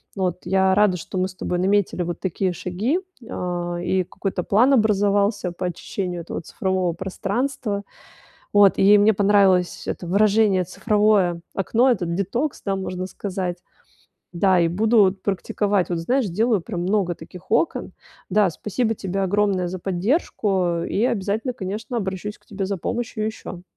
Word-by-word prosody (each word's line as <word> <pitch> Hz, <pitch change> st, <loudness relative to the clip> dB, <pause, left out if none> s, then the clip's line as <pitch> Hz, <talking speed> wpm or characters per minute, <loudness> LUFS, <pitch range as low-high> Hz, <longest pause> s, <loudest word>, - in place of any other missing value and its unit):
вот. 185 Hz, -3 st, -1 dB
Я 190 Hz, 0 st, +3 dB
рада, 205 Hz, -2 st, +4 dB
что 180 Hz, -, -6 dB
мы 185 Hz, 0 st, +1 dB
с 190 Hz, -, -11 dB
тобой 180 Hz, -1 st, -2 dB
наметили 195 Hz, -1 st, +1 dB
вот 175 Hz, 0 st, -4 dB
такие 190 Hz, 0 st, -1 dB
шаги, 205 Hz, -, -1 dB, 0.3 s
а, 175 Hz, -1 st, -3 dB
и 185 Hz, +2 st, 0 dB
какой-то 185 Hz, 0 st, -4 dB
план 240 Hz, +7 st, +4 dB
образовался 205 Hz, -3 st, +2 dB
по 175 Hz, +1 st, -5 dB
очищению 180 Hz, 0 st, -4 dB
этого 165 Hz, -, -5 dB
цифрового 185 Hz, -1 st, -1 dB
пространства, 200 Hz, +4 st, -2 dB, 0.7 s
вот, 205 Hz, -1 st, +6 dB
и 205 Hz, +2 st, +6 dB
мне 210 Hz, +2 st, +5 dB
понравилось 195 Hz, -3 st, +3 dB
это 175 Hz, -, -4 dB
выражение 205 Hz, -1 st, +3 dB
"цифровое 205 Hz, -3 st, +2 dB
окно", 230 Hz, +6 st, +2 dB
этот 175 Hz, -8 st, 0 dB
"детокс", 235 Hz, +10 st, -2 dB
да, 195 Hz, -1 st, 0 dB
можно 185 Hz, -1 st, -4 dB
сказать. 185 Hz, -2 st, -4 dB, 0.7 s
Да, 185 Hz, 0 st, +3 dB
и 165 Hz, -, +3 dB
буду 220 Hz, +6 st, +3 dB
вот 195 Hz, -1 st, +3 dB
практиковать, 200 Hz, 0 st, 0 dB
вот, 170 Hz, -, 0 dB
знаешь, 250 Hz, +10 st, +1 dB
сделаю 210 Hz, +1 st, +1 dB
прям 175 Hz, -, -5 dB
много 190 Hz, -2 st, +1 dB
таких 175 Hz, +3 st, -13 dB
окон. 235 Hz, +9 st, 0 dB, 0.4 s
Да, 205 Hz, 0 st, +4 dB
спасибо 220 Hz, +7 st, -2 dB
тебе 195 Hz, -1 st, -3 dB
огромное 195 Hz, -2 st, +1 dB
за 185 Hz, -, -5 dB
поддержку. 190 Hz, -, 0 dB
И 210 Hz, -, 0 dB
обязательно, 220 Hz, +2 st, -1 dB
конечно, 215 Hz, +3 st, -4 dB
обращусь 195 Hz, +1 st, -4 dB
к -, -, -34 dB
тебе 200 Hz, -1 st, -4 dB
за 195 Hz, 0 st, -3 dB
помощью 225 Hz, +2 st, -3 dB
ещё. 200 Hz, -5 st, -7 dB
195 Hz, 155 wpm, -22 LUFS, 180-210 Hz, 0.7 s, вот